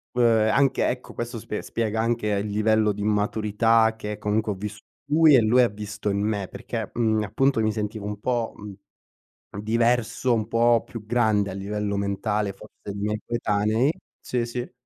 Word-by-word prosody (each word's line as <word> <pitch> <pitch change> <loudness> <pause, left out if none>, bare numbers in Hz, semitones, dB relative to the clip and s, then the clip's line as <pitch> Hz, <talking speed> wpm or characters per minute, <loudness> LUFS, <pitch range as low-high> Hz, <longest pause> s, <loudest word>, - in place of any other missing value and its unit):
Uhm, 125 - +2 0.3
anche, 135 +2 +2
ecco 125 0 -4
questo 120 0 -4
sp 105 - -5
spiega 110 -1 -2
anche 115 -1 0
il 100 -1 0
livello 110 +1 +2
di 105 0 -6
maturità, 110 +2 +2
che 105 -1 -6
comunque 105 +1 0
ho - - -3
visto 105 +2 -7 0.3
in 145 - 0
lui, 160 -1 +7
e 125 - +6
lui 120 +3 +4
ha 120 - +3
visto 105 0 -5
in 100 - -1
me, 105 -2 -1
perché, - - -6
mhmm, 110 -2 +1
appunto 135 +4 +1
mi 110 0 +2
sentivo 105 -1 -4
un 105 0 -5
po’, 120 0 -1
mhmm, 105 -2 -9 0.9
diverso, 120 +2 +1
un 110 -1 -1
po’ 115 0 +3
più 110 -3 -9
grande 110 -4 +2
a - - -6
livello 100 +1 -3
mentale, 100 +1 -1
forse, 95 - -15
dei 100 - -6
miei 105 +1 -1
coetanei 110 +2 +1 0.3
sì, 125 -2 -2
sì. 120 +1 -5
110 Hz, 180 wpm, -24 LUFS, 105-115 Hz, 0.9 s, lui